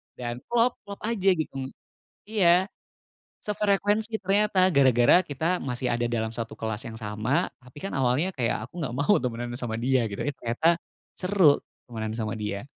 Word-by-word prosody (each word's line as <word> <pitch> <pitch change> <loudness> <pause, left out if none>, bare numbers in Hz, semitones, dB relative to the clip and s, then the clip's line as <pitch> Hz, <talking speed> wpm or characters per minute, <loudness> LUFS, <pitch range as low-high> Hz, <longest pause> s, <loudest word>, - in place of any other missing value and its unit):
dan 120 -1 -5
klop 240 +1 +2
klop 200 - -8
aja, 210 -4 +1
gitu. 135 -4 -4 0.6
Iya, 190 -3 +4 0.7
sefrekuensi 210 +1 +1
ternyata 195 -1 +3
gara-gara 130 +1 +5
kita 165 +4 -1
masih 125 -1 -2
ada 120 0 0
dalam 110 -2 -2
satu 115 -1 -5
kelas 110 0 -3
yang 115 - -7
sama, 110 +4 -1
tapi, 125 +2 -17
kan, 195 - -3
awalnya 135 +7 +1
kayak 120 - -1
aku 150 +10 -9
nggak 135 -7 -3
mau 145 +10 +3
temenan 120 -1 -3
sama 115 -2 -3
dia, 125 0 +1
gitu, 100 -2 -5
eh, 145 - 0
ternyata 160 +9 +1 0.3
seru 180 -6 +4 0.2
temenan 110 -2 -5
sama 110 -1 -2
dia. 105 -1 -3
130 Hz, 160 wpm, -26 LUFS, 115-185 Hz, 0.7 s, gara-gara